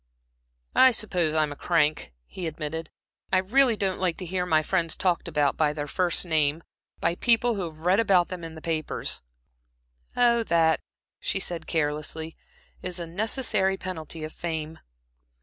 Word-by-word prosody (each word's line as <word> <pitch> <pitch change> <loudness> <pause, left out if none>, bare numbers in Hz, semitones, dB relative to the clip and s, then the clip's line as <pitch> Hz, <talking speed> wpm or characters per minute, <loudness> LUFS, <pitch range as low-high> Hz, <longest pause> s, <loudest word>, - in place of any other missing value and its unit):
"I 260 - +8
suppose 180 -9 +1
I'm 155 -1 +2
a - - -6
crank," 155 - +1
he 180 - -6
admitted. 160 +1 -5 0.4
"I 190 - +4
really 230 +5 +3
don't 190 -2 -1
like 180 -3 0
to 185 - -6
hear 180 +1 -2
my 155 -2 +3
friends 170 0 0
talked 180 -3 0
about, 150 -4 +1
by 150 -2 +2
their 150 -1 -3
first 175 +4 +1
name 155 -1 +1 0.4
by - - +1
people 235 +4 +3
who 195 -4 -2
have 155 -1 -9
read 185 +3 +4
about 190 -6 +4
them 180 -2 -6
in 165 -1 -7
the 160 - -11
papers." 160 -2 -2 1.0
"Oh, 235 -1 +4
that," 165 -3 +3 0.4
she - - -1
said, 170 -4 -4
carelessly 160 +1 -2 0.5
"is 180 0 -4
a 170 - -4
necessary 195 +1 0
penalty 165 -4 -6
of 155 - -6
fame." 160 -2 -4
170 Hz, 165 wpm, -26 LUFS, 155-190 Hz, 1.0 s, I